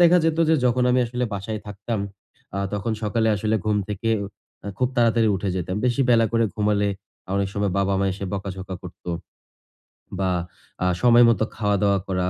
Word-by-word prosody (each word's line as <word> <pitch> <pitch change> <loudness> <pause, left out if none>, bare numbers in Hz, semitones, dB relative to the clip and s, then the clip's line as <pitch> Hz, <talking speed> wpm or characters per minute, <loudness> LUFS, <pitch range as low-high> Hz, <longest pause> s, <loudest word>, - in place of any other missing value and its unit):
দেখা 175 +1 +7
যেত 165 0 +1
যে 160 - +5
যখন 125 +1 +2
আমি 125 - +3
আসলে 125 +1 -2
বাসায় 105 +2 -4
থাকতাম 105 +2 -4 0.6
আ - - -1
তখন 105 +2 -1
সকালে 110 +1 +1
আসলে 110 +2 0
ঘুম 105 -1 +1
থেকে 105 +2 -3
উ - - -3 0.5
খুব 125 - +2
তাড়াতাড়ি 115 -1 +4
উঠে 100 +1 -3
যেতাম। 90 +2 -3
বেশি 120 +2 +1
বেলা 115 -1 +5
করে 115 0 +3
ঘুমালে 105 -1 +1 0.5
অনেক 100 -1 0
সময় 100 -2 0
বাবা-মা 100 0 +1
এসে 100 +1 -6
বকা-ঝকা 95 -1 -5
করত। 90 - -11 1.2
বা 95 -1 +1 0.5
আ - - +2 0.2
সময়মতো 120 -2 +6
খাওয়া-দাওয়া 100 -2 +2
করা, 90 -1 0
105 Hz, 165 wpm, -23 LUFS, 100-115 Hz, 1.2 s, দেখা